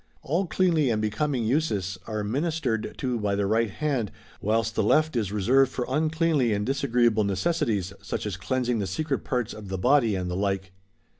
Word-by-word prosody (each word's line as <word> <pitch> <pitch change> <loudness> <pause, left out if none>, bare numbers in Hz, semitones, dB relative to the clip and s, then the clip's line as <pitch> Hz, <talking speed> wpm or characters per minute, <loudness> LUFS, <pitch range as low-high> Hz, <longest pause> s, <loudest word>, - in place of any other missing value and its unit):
All 175 +7 0
cleanly 165 -7 +2
and 110 -2 +1
becoming 115 +4 -1
uses 105 - 0
are 110 -2 -2
minis 150 +10 -1
tered 115 -7 -2
to 125 -3 -1
by 100 -1 0
the 100 0 0
right 110 +2 +2
hand, 130 -3 -1 0.3
whilst 115 +2 +1
the - - +1
left 155 +8 +3
is 110 -5 0
reserv^ed 120 +7 +3
for 125 -1 -3
uncleanly 155 -3 +1
and 105 0 -1
disagreeable 120 -5 +2
necessities, 100 - 0
such 100 - -4
as 105 -3 -2
cleansing 125 +3 -1
the 100 - -1
secret 150 +3 -2
parts 125 -3 -2
of 105 -2 -9
the 95 - -2
body 120 0 +3
and 90 -1 -2
the - - -2
like. 95 -1 -1
115 Hz, 190 wpm, -26 LUFS, 105-140 Hz, 0.3 s, left